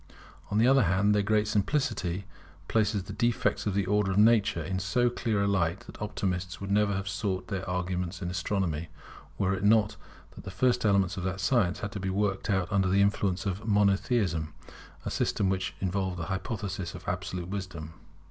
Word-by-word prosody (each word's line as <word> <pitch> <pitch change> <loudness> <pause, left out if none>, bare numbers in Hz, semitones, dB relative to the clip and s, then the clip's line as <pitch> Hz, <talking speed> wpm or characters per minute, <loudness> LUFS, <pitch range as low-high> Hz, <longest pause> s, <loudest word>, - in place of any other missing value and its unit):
On 105 - 0
the 110 - +5
other 135 +1 +6
hand, 95 +4 +3
their 105 - +3
great 105 +1 +2
simplicity 105 - 0 0.4
places 105 -3 +1
the 100 - -8
defects 120 +1 0
of 100 - -1
the 100 -2 +1
Order 105 +1 +2
of 95 - 0
Nature 105 -6 +4
in 95 +3 -2
so 120 +7 +1
clear 110 -4 0
a - - +1
light, 95 -2 +1
that - - -13
optimists 90 -3 -2
would 100 0 -5
never 100 0 +3
have 95 0 -3
sought 95 -1 -2
their 95 -2 -3
arguments 90 0 -2
in 90 -2 -3
astronomy, 90 -3 -1 0.5
were 95 -1 +1
it 95 0 -3
not 110 0 +4 0.3
that - - -12
the - - -6
first 120 +6 +1
elements 100 -1 +2
of 95 - -3
the 95 0 -2
science 95 -1 +1
had 100 - -3
to 105 - -5
be 95 0 -2
worked 100 +1 -1
out 95 -3 +1
under 95 -2 +2
the 100 +2 +4
influence 100 -2 0
of 100 +3 -3
Monotheism, 100 -6 +1 0.5
a - - -2
system 95 - 0
which 95 0 -2
involved 95 -1 -1
the 85 - -3
hypothesis 95 -3 -4
of 90 - -11
absolute 90 0 -3
wisdom. 90 -5 -5
95 Hz, 195 wpm, -29 LUFS, 90-105 Hz, 0.5 s, other